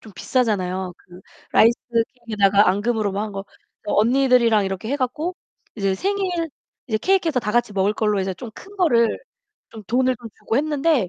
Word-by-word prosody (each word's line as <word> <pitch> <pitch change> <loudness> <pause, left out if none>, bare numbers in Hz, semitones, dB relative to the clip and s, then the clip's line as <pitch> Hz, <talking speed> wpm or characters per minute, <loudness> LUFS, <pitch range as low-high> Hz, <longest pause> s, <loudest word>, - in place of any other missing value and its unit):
좀 215 - -14
비싸잖아요. 190 -5 -1
그 180 0 -15 0.3
라이스 230 +2 +6 0.5
케이크에다가 200 -2 +4
앙금으로 210 +2 0
뭐 200 +2 -2
한 215 - -5
거 195 0 -5 0.4
그래서 210 - -2
언니들이랑 235 -2 +4
이렇게 195 +3 -4
해 280 - 0
갖고 295 +7 -2 0.4
이제 195 -3 0
생일 375 - -1 0.4
이제 220 - 0
케이크해서 335 - +1
다 210 - -2
같이 240 -2 +1
먹을 195 +1 +1
걸로 210 -2 0
이제 190 0 -2
좀 225 +5 -9
큰 405 +1 -13
거를 235 - +3 0.5
좀 220 - -10
돈을 255 +4 +1
더 235 - -10
주고 225 - -2
했는데 295 - +1
225 Hz, 380 characters per minute, -22 LUFS, 200-265 Hz, 0.5 s, 라이스